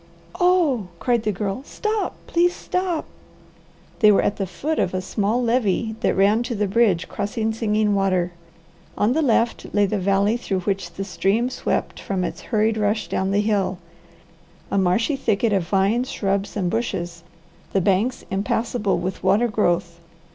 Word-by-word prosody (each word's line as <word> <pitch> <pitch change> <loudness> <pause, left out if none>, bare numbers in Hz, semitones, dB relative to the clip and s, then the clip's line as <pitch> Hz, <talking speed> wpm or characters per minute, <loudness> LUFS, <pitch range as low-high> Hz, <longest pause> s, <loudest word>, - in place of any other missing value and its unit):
"Oh," 335 - +3
cried 240 +4 +1
the 215 - 0
Girl. 200 +4 -3
"Stop! 430 +7 -2
Please 350 +1 +2
stop!" 365 -3 -2 0.9
They 215 -3 +7
were 200 - +4
at 205 - 0
the 195 - -2
foot 310 - -2
of 185 - 0
a - - 0
small 210 +5 0
levee 230 -2 +1
that - - +1
ran 205 +4 +4
to 240 0 -3
the 210 0 0
bridge 200 -4 +2
crossing 220 +2 -2
Singing 215 -2 +1
Water. 185 -3 +1 0.7
On 215 +4 +2
the 320 - +1
left 235 -4 +1
lay 205 0 +4
the 200 +1 -1
valley 200 +4 +2
through 195 -5 -2
which 185 -2 -2
the 195 - -4
stream 195 +7 0
swept - - -2
from 190 -2 -2
its - - -4
hurried 220 -1 +2
rush 210 0 0
down 190 - 0
the 200 +1 +2
hill, 200 -3 0 0.9
a - - +1
marshy 195 - +2
thicket 225 -4 +1
of 185 -4 0
vines, 210 +6 +1
shrubs, 200 +1 -2
and 180 -3 0
bushes, 175 -7 -3 0.5
the 195 - +2
banks 200 +7 +1
impassable 205 +1 0
with 185 +2 -4
water 230 +4 +3
growth. 175 -5 0
210 Hz, 165 wpm, -22 LUFS, 195-235 Hz, 0.9 s, They